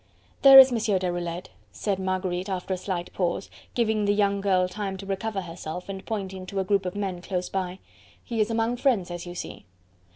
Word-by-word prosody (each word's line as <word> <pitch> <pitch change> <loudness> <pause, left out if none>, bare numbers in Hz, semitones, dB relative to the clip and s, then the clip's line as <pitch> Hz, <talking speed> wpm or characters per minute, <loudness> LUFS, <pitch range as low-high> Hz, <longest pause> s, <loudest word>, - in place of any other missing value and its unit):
"There 270 -1 +10
is 265 -1 +11
Monsieur 220 -4 +1
Deroulede," 175 -1 -3 0.2
said 200 -3 -2
Marguerite 185 0 -2
after 190 0 -2
a - - -2
slight 180 -1 -4
pause, 180 +1 -2 0.2
giving 220 -3 +1
the 205 0 +2
young 200 -1 +2
girl 185 -2 +2
time 195 +1 -4
to 195 - -8
recover 195 +1 -2
herself 170 0 -7
and 195 -1 -5
pointing 190 -4 -5
to 195 +1 -3
a - - +1
group 195 -1 +1
of 180 - -5
men 190 -3 -3
close 180 -1 -3
by. 185 -1 -3 0.5
"He 230 -2 -1
is 215 - +1
among 230 +1 0
friends, 230 -10 +1
as 175 0 -6
you 175 - -7
see." - - -7
190 Hz, 200 wpm, -26 LUFS, 180-210 Hz, 0.5 s, is